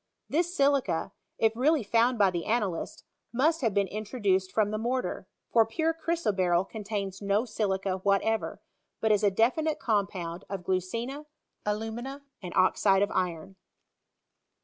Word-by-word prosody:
This 345 +4 0
silica, 270 -12 +2 0.3
if 225 0 +2
really 285 +3 +3
found 235 +4 +2
by 200 -3 +4
the 170 -2 -3
analysts, 210 -7 -1 0.3
must 305 +7 +2
have 225 -5 +1
been 200 -1 +2
introduced 200 -3 -1
from 210 +1 +1
the 215 - -2
mortar, 250 +3 -2 0.3
for 230 - +7
pure 320 +9 0
chrysoberyl 205 - +1
contains 205 -3 -4
no 200 +3 +1
silica 195 -4 -1
whatever, 200 +3 0 0.4
but 220 - +2
is 210 0 +3
a 205 - +5
defi 230 +10 +2
nite 310 -1 0
compound 195 -5 -1
of 195 -2 -4
glucina, 230 - -2 0.4
alumina, 225 +6 -3 0.2
and 180 -3 -6
oxide 195 +1 +4
of 205 - -1
iron. 180 +1 -2
215 Hz, 145 wpm, -28 LUFS, 190-245 Hz, 0.4 s, for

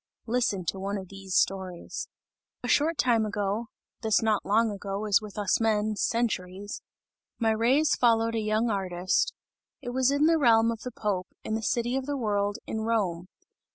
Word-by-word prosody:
Listen 225 -6 0
to 190 - -2
one 200 +1 -2
of 190 -2 -8
these 195 -1 -6
stories! 185 -2 -1 0.6
A - - -3
short 310 +2 +2
time 235 -3 +3
ago 210 +1 -2 0.3
(this 220 -1 +2
not 215 -2 +2
long 220 +2 +2
ago 200 +1 -4
is 205 -1 +3
with 210 -1 -10
us 205 +2 +1
men 215 -1 +1
centuries) 205 -4 -2 0.6
my 225 -2 +2
rays 255 +7 +3
followed 230 -1 +3
a 225 - 0
young 215 +2 +1
artist; 185 -2 0 0.5
it 245 - -6
was 260 +1 +2
in 285 +2 +3
the 325 0 +4
realm 230 -4 +5
of 230 - -5
the 250 - -5
Pope, 200 -5 -2 0.2
in 220 - -3
the 220 - -1
city 240 +3 0
of 265 0 -2
the 290 -1 -1
world, 205 -3 0
in 220 - -3
Rome. 195 -6 -1
220 Hz, 180 wpm, -28 LUFS, 200-235 Hz, 0.6 s, realm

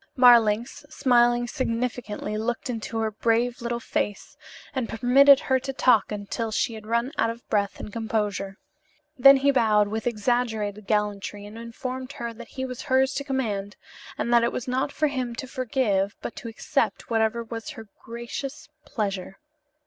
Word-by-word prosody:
Marlanx, 240 0 +5
smiling 240 -4 +3
significantly, 230 -4 -3
looked 240 +3 -2
into 225 -1 -4
her 220 -1 0
brave 235 +3 0
little 235 0 -2
face, 205 -3 -3 0.4
and 260 -4 -2
permitted 270 +4 +6
her 260 -1 +1
to 270 +1 -4
talk 250 -6 +3
on 210 -1 -3
until 225 +3 -3
she 230 - 0
had 215 -1 -9
run 235 +3 0
out 225 - +3
of 230 +1 -8
breath 200 -2 0
and 210 - -8
composure. 210 -3 -2 0.6
Then 275 +1 +8
he 280 +1 +3
bowed 215 -5 +3
with 220 +2 -3
exaggerated 215 -3 -1
gallantry 205 -1 -1
and 210 +1 -10
informed 255 +3 -6
her 235 -1 -5
that 235 +1 -11
he 260 -1 -5
was 250 0 -6
hers 265 +1 +2
to 280 - -2
command, 215 -8 -2 0.4
and 240 - -1
that 235 -1 +6
it 235 - +1
was 250 - -5
not 260 +3 0
for 310 - 0
him 255 -5 -2
to 250 - -5
forgive 235 -7 0
but - - -6
to - - -7
accept 275 +3 -2
whatever 225 +1 +1
was 225 0 -7
her 225 - -9 0.2
gracious 235 +5 -6 0.2
pleasure. 195 -3 -3
235 Hz, 170 wpm, -25 LUFS, 215-255 Hz, 0.6 s, Then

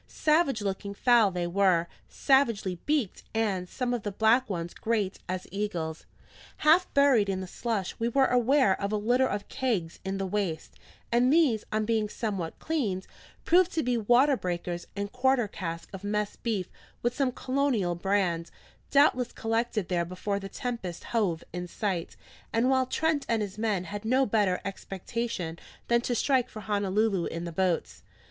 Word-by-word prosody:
Savage 300 -8 +2
looking 200 0 -3
fowl 235 -2 +5
they 180 -2 -2
were, 175 -1 +3 0.2
savagely 230 - +2
beaked, 290 -10 0
and 195 -5 0
some 250 -2 -2
of 240 - -1
the 205 - -3
black 220 +5 +3
ones 170 -3 -3
great 215 -4 -1
as 185 0 -3
eagles. 175 -6 -3 0.5
Half 330 +4 +4
buried 270 -8 +5
in 190 -1 -1
the 190 - -4
slush, 205 0 -3
we 230 +1 +1
were 270 +2 +4
aware 250 -4 +3
of 200 +1 -1
a 215 - +1
litter 245 +5 +2
of 205 -3 -3
kegs 220 -12 -2
in 190 0 -3
the 195 - -2
waist; 185 -5 -2 0.4
and 245 +2 +4
these, 290 -9 +3
on 215 0 0
being 220 -1 0
somewhat 195 -8 -3
cleaned, 215 -13 -2 0.4
proved 365 +1 +4
to 320 - 0
be 250 0 +1
water 245 +5 +4
beakers 175 -4 -4
and 200 0 -3
quarter 250 -2 +2
casks 170 -3 -6
of 195 0 -8
mess 210 0 -1
beef 210 -6 -3 0.3
with 240 0 +1
some 270 -1 +1
colonial 255 -9 0
brand, 175 -2 0 0.4
doubtless 265 -4 +4
collected 225 -3 -1
there 175 -2 +1
before 185 +3 -3
the 195 0 -7
Tempest 210 -8 -5
hove 195 -8 0
in 180 0 -4
sight, 185 -2 -3 0.4
and 240 +3 +2
while 260 -1 +2
Trent 315 0 0
and 225 -2 +2
his 205 +1 -7
men 210 -5 0
had 205 +3 -6
no 255 +4 +3
better 205 -5 +1
expectation 195 -2 -4 0.3
than 235 0 +4
to 245 0 -1
strike 260 -1 +2
for 215 - -8
Honolulu 205 -2 +1
in 170 +1 -4
the 170 - -5
boats. 180 0 -1
210 Hz, 170 wpm, -28 LUFS, 185-245 Hz, 0.5 s, fowl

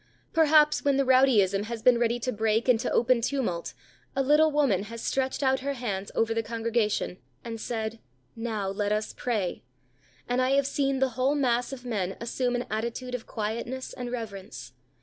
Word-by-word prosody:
Perhaps, 305 -2 +5
when 280 -1 +3
the 275 - +2
rowdyism 220 -7 +4
has 225 -1 -6
been 245 -2 +5
ready 235 0 +1
to 255 - -1
break 220 +1 0
into 250 -1 +3
open 240 0 +3
tumult, 230 -10 -2 0.4
a 270 - +2
little 300 +3 +5
woman 260 -10 +2
has 230 +2 -8
stretched 265 +1 -1
out 265 0 +3
her 280 +2 -2
hands 205 -6 -4
over 225 0 +1
the 225 - 0
congregation, 225 -4 -1 0.2
and 225 -1 -6
said, 220 -1 -3 0.4
"Now, 225 -4 -3
let 205 +1 -1
us 215 0 -1
pray;" 215 -8 -2 0.7
and 245 +1 +1
I 255 +1 +2
have 280 0 +3
seen 275 -1 0
the 265 - +3
whole 255 +4 +1
mass 245 -3 +1
of 255 -2 -8
men 195 -6 -2
assume 245 +1 -1
an 245 - -2
attitude 235 +3 -3
of 250 -2 -5
quietness 235 +4 -4
and 245 -2 -6
reverence. 195 - -7
235 Hz, 180 wpm, -27 LUFS, 220-260 Hz, 0.7 s, Perhaps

